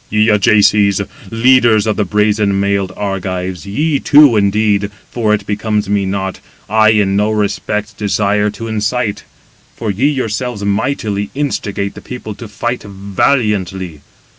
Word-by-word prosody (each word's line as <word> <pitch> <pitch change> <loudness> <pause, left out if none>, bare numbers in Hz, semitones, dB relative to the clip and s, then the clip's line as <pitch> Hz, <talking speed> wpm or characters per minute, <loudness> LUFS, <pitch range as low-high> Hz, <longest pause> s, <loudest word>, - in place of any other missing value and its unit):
"Ye 105 +1 +2
Ajaces, 105 -1 +4 0.3
leaders 120 -2 +4
of 110 -2 0
the 105 - 0
brazen 105 -1 +1
mailed 100 -1 0
Argives, 95 -3 -4
ye 145 +8 0
two, 145 -4 +6
indeed, 100 0 +1 0.2
for 110 -3 0
it 105 - 0
becomes 105 -1 -1
me 100 -1 +1
not, 95 0 -3 0.3
I 110 +1 +4
in 105 -3 +2
no 105 +2 +2
respect 105 0 -2
desire 105 0 +1
to 115 +2 -7
incite; 110 0 -2 0.5
for 110 -3 -2
ye 115 +9 +1
yourselves 125 -5 -2
mightily 100 -1 -1
instigate 105 -8 -2
the - - -11
people 125 -4 -7
to 115 +3 -9
fight 120 +4 -3
valiantly. 100 - -1
105 Hz, 140 wpm, -15 LUFS, 100-110 Hz, 0.5 s, two